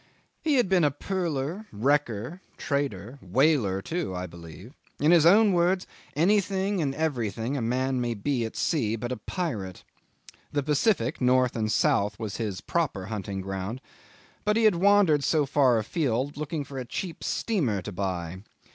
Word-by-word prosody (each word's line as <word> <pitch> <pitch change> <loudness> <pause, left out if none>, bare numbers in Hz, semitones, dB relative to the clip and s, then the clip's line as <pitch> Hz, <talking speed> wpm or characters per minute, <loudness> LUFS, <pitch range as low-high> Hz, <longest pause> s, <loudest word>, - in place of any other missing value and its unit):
He 310 -3 +2
had 245 -6 +3
been 175 -6 +3
pearler, 175 +1 -3
wrecker, 130 - 0 0.2
trader, 140 - -3
whaler 105 - +2
too, 165 - -3
I 90 0 -3
believe; 85 - -11 0.3
in 150 +3 +4
his 165 -2 +6
own 205 +2 +6
words 180 +2 +2 0.3
anything 195 +2 +2
and 135 -3 -1
everything 120 -5 -2
a 135 - -2
man 130 +2 0
may 120 -1 -1
be 125 +3 -1
at 110 - -5
sea, 115 -10 0
but 120 +2 -4
a 125 - -2
pirate. 105 - -4 0.7
The 145 -1 0
Pacific, 150 - +1
north 125 0 +3
and 110 -2 -1
south, 100 -1 +2
was 110 -3 -5
his 105 -5 -3
proper 145 - -1
hunting 100 -2 -4
ground; 95 +5 -4 0.6
but 210 +1 +2
he 230 - +2
had 215 -2 +6
wandered 180 -5 +4
so 150 +1 +2
far 135 -3 +3
afield 130 +3 -1
looking 150 0 -3
for 135 -1 -7
a 125 - -5
cheap 170 +7 -5
steamer 145 - 0
to 105 - -6
buy. 90 -2 -4
135 Hz, 160 wpm, -27 LUFS, 110-170 Hz, 0.7 s, his